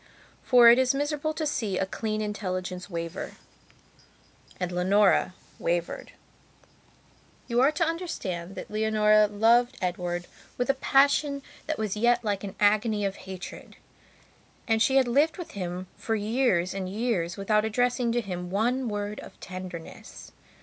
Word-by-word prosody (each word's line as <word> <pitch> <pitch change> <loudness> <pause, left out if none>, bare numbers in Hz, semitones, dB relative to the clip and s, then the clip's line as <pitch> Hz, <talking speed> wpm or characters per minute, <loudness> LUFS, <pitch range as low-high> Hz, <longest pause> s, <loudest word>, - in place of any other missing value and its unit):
For 245 -2 +6
it 240 - +5
is 260 +1 +2
miserable 290 +2 -1
to 315 - -2
see 215 -10 -1
a - - +1
clean 215 +2 -3
intelligence 185 -3 -4
waver; 170 0 -5 1.3
and 180 -1 -2
Leonora 185 +1 +3 0.2
wavered. 170 0 -2 1.3
You 240 0 +2
are 275 +3 +5
to 330 +2 +1
understand 195 - -4
that - - -8
Leonora 215 0 +4
loved 235 +5 +3
Edward 175 -1 -2 0.3
with 245 +2 +2
a - - -3
passion 280 +1 +2 0.2
that 310 0 -1
was 215 -2 -2
yet 240 +2 +2
like 205 -2 -1
an 200 0 -6
agony 210 0 +2
of 195 0 -2
hatred. 185 0 -8 0.9
And 225 -1 +2
she 265 - +3
had 265 -2 +4
lived 285 +6 +2
with 355 - -7
him 180 -1 -5
for 225 - -2
years 210 -4 +1
and 190 -1 -4
years 200 -5 -1
without 210 +2 +2
addressing 245 +2 +1
to 240 - +1
him 180 -4 -5
one 240 +6 0
word 205 0 -4
of - - -12
tenderness. 185 -3 -9
215 Hz, 145 wpm, -27 LUFS, 185-245 Hz, 1.3 s, For